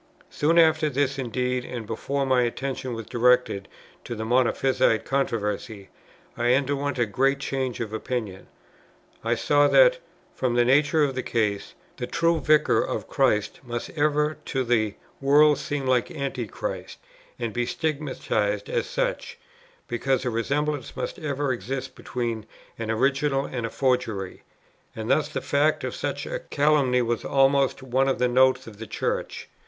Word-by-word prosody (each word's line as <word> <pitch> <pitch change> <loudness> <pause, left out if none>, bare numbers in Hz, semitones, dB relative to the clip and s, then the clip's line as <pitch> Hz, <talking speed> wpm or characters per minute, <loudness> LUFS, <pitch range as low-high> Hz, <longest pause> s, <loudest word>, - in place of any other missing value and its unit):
Soon 160 +3 +2
after 160 -2 +5
this 140 0 0
indeed, 125 0 -1
and 120 -3 -6
before 135 +6 -2
my 130 -1 +3
attention 130 +1 -3
was 115 -1 -6
directed 125 -4 +2 0.4
to 120 - -5
the 110 0 -4
Monophysite 125 -1 +2
controversy, 105 -6 -2 0.5
I 120 +1 +3
underwent 140 +1 -1
a 120 - +2
great 135 +6 +1
change 135 -3 -3
of 110 -2 -4
opinion. 110 -4 -4 0.8
I 115 +1 +1
saw 145 +4 +3
that, - - +5 0.3
from 125 -2 -1
the 120 0 +4
nature 145 +4 +4
of 140 -2 +1
the 130 - -2
case, 105 -5 -1 0.2
the 125 - -4
true 165 0 +1
Vicar 155 -1 +3
of - - -4
Christ 105 -1 +1
must 120 -2 -5
ever 150 0 +1
to 135 -2 -1
the 110 -4 +1 0.3
world 145 +1 +5
seem 145 -2 -3
like 130 -2 +2
Antichrist, 135 - -5 0.4
and 115 -3 -3
be 120 0 -1
stigmatized 130 -9 -2
as - - 0
such, - - -2 0.5
because 130 +2 0
a 125 - 0
resemblance 145 +5 -2
must - - -4
ever 145 -3 -1
exist 130 +1 -5
between 115 -4 -4 0.3
an 115 -1 -4
original 135 +4 +1
and 120 -3 -3
a - - -6
forgery; 125 -8 -1 0.5
and 110 +1 -3
thus 155 -1 +2
the - - -4
fact 145 +2 +1
of - - -3
such - - -3
a - - -4
calumny 140 - +2
was 120 -1 -1
almost 135 -1 +2
one 130 +1 +1
of 135 - +1
the 125 - +2
notes 130 +1 +3
of 110 -3 -11
the 110 +1 -8
Church. - - -3
130 Hz, 155 wpm, -25 LUFS, 120-145 Hz, 0.8 s, after